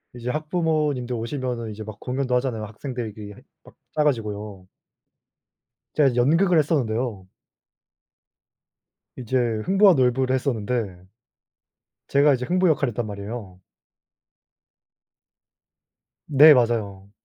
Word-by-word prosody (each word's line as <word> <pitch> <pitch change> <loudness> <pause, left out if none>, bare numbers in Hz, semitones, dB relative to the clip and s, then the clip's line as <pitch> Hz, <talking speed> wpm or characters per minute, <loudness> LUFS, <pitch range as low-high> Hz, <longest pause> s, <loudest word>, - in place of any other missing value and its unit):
이제 120 0 -5
학부모님들 150 -4 -1
오시면은 120 -1 -4
이제 110 +1 -8
막 110 -1 -10
공연도 125 0 -2
하잖아요. 125 -4 -1
학생들이 115 +1 -6
그 105 -1 -11 0.2
막 - - -18 0.2
짜 150 - +2
가지고요. 105 -8 -3 1.3
제가 145 -3 +4
이제 125 - -5
연극을 165 +8 +3
했었는데요. 120 - -1 1.9
이제 130 0 -2 0.3
흥부와 195 +1 +5
놀부를 130 -2 +1
했었는데 120 -6 -2 1.1
제가 140 +1 +4
이제 125 -1 -2
흥부 180 +3 +2
역할을 140 -4 +1
했단 120 +1 -3
말이에요. 100 -2 -8 2.7
네 150 +2 +8
맞아요. 105 -6 -1
125 Hz, 260 characters per minute, -23 LUFS, 110-145 Hz, 2.7 s, 네